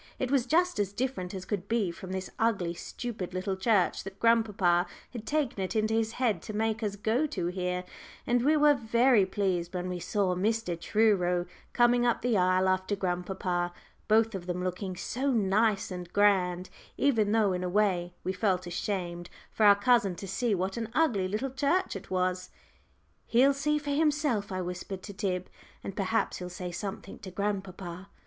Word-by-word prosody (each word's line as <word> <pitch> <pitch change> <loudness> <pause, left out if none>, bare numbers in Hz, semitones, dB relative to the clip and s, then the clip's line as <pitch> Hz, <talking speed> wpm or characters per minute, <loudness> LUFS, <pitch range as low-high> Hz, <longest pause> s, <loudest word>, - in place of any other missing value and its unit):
It 255 0 -2
was 265 -3 +2
just 350 +3 +2
as 200 -2 0
different 240 -7 -2
as 190 0 -6
could 200 -2 -3
be 220 -5 +1
from 185 +2 -9
this 190 0 -4
ugly, 200 -7 +1
stupid 190 -1 -6
little 190 +1 -1
church 190 -1 +2
that 195 0 -9
grandpapa 205 -7 +3 0.2
had 230 -3 -8
taken 290 -9 0
it 185 - -4
into 215 0 +1
his 225 0 0
head 225 -9 0
to 215 - -7
make 220 +1 0
us 205 -2 -2
go 225 +8 +1
to 185 - -3
here, 180 0 -2 0.4
and 240 0 +2
we 305 +3 +4
were 295 0 +6
very 235 -3 +3
pleased 185 -3 -1
when 180 0 -2
we 180 -1 -3
saw 195 0 0
Mr. 205 0 0
Truro 180 -3 +2 0.3
coming 240 0 +4
up 240 -1 +1
the 245 -2 +2
aisle 185 0 +3
after 185 +2 +1
grandpapa, 180 -1 -2 0.4
both 225 +1 +4
of 185 -2 -6
them 180 0 -2
looking 185 +1 -3
so 255 +9 -2
nice 210 -1 +2
and 180 -1 -6
grand, 185 -3 +2 0.3
even 225 -7 +2
though 215 -3 +3
in 180 0 -2
a 180 - -1
way 180 -3 +1
we 185 - -1
felt 185 -2 0
ashamed 175 -1 -3 0.2
for 215 - +4
our 200 - +8
cousin 205 -3 +3
to 195 - -7
see 215 +3 0
what 190 +4 -2
an 230 -1 -3
ugly 235 -13 +2
little 220 +7 -2
church 285 - 0
it 195 - -8
was. 185 0 -1 0.8
"He'll 265 +4 +5
see 300 +2 0
for 290 -1 -4
himself," 290 -8 +1
I 185 0 -2
whispered 180 +1 -5
to 200 - -8
Tib, 185 -2 -2 0.4
"and 195 - -6
perhaps 205 +3 0
he'll 180 0 -6
say 180 0 -6
something 195 +2 -6
to 190 - -8
grandpapa." 190 -1 -4
200 Hz, 185 wpm, -29 LUFS, 185-230 Hz, 0.8 s, our